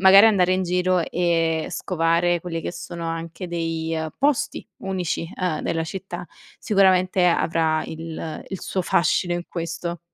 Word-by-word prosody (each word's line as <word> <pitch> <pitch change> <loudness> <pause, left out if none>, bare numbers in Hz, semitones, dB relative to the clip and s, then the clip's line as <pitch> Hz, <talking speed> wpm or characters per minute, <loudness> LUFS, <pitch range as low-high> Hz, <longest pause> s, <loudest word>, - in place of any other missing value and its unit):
magari 195 +2 +9
andare 185 -5 +4
in 190 - 0
giro 180 0 +2
e 165 -1 +1
scovare 170 0 +1
quelli 165 -1 -4
che - - -3
sono 170 -2 -6
anche 165 +3 -5
dei, 165 -1 -2
ehm, 160 0 -2
posti 295 +1 +1
unici, 180 -3 -2
ehm, 180 -4 -1
della 165 - -1
città, 175 0 -6 0.3
sicuramente 185 -2 +3
avrà 160 -2 +2
il 160 -1 -6
il 190 - -5
suo 190 - -2
fascino 175 +1 +2
in 175 0 -3
questo. 170 0 -4
175 Hz, 150 wpm, -23 LUFS, 165-185 Hz, 0.3 s, magari